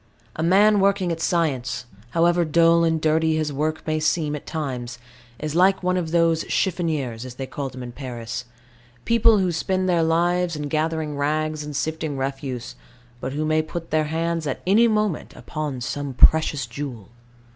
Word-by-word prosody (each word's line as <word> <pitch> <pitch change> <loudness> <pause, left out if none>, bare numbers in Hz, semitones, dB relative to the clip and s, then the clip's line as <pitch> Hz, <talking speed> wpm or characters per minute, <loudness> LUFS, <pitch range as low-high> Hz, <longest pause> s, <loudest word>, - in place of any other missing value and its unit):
A - - -4
man 200 +5 +5
working 195 -2 +2
at 165 0 -3
science, 130 -9 0 0.2
however 170 +3 +3
dull 170 +1 +4
and 160 -1 +2
dirty 160 +1 +2
his 155 -2 -1
work 155 +3 -2
may 155 0 0
seem 155 -1 0
at 150 - -9
times, 130 -7 -4 0.4
is 155 -1 -4
like 190 +3 +3
one 180 0 +1
of 175 -3 -1
those 165 -1 +2
"chiffoniers," 155 - -1
as 130 -1 -8
they 135 - -5
call 135 +1 -5
them 130 -1 -8
in 120 - -7
Paris 120 -2 -6 0.6
people 230 -1 +5
who 185 -3 +1
spend 185 +3 -1
their 175 -2 +3
lives 170 +1 +1
in 150 -1 -4
gathering 155 -1 -1
rags 155 +1 -1
and 150 -1 -7
sifting 155 0 -2
refuse, 135 - -4 0.5
but 130 +2 -4
who 155 +2 -1
may 155 0 +2
put 165 +1 -7
their 155 0 +2
hands 165 +1 -2
at 135 - -4
any 215 +6 +5
moment 210 -6 -1
upon 145 +1 -5
some 140 +2 -4
precious 150 -1 +4
jewel. 120 -4 -7
155 Hz, 175 wpm, -23 LUFS, 140-170 Hz, 0.6 s, man